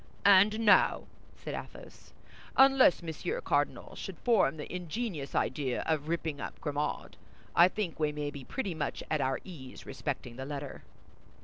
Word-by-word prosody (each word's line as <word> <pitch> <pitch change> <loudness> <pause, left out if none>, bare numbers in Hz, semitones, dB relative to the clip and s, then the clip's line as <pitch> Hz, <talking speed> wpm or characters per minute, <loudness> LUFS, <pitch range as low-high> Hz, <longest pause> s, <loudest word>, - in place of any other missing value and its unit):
"And 205 +3 +6
now," 210 -2 +5 0.3
said - - -6
Athos, - - -10 0.5
"unless 270 -9 +6
Monsieur 170 - -3
Cardinal - - -1
should - - -7
form 225 -9 +2
the 150 - -7
ingenious 180 - -4
idea 135 -4 0
of 155 -2 0
ripping 160 -3 -2
up - - -6
Grimaud, 150 -1 -3 0.4
I 170 +1 +8
think 185 -4 -4
we 150 -1 +1
may 150 -1 -3
be 140 -2 -8
pretty 200 - -3
much 160 -2 -3
at 155 -2 +1
our 135 0 0
ease 145 -9 -10
respecting 130 -4 -5
the 130 - -5
letter." 140 -1 -6
160 Hz, 150 wpm, -31 LUFS, 145-200 Hz, 0.5 s, I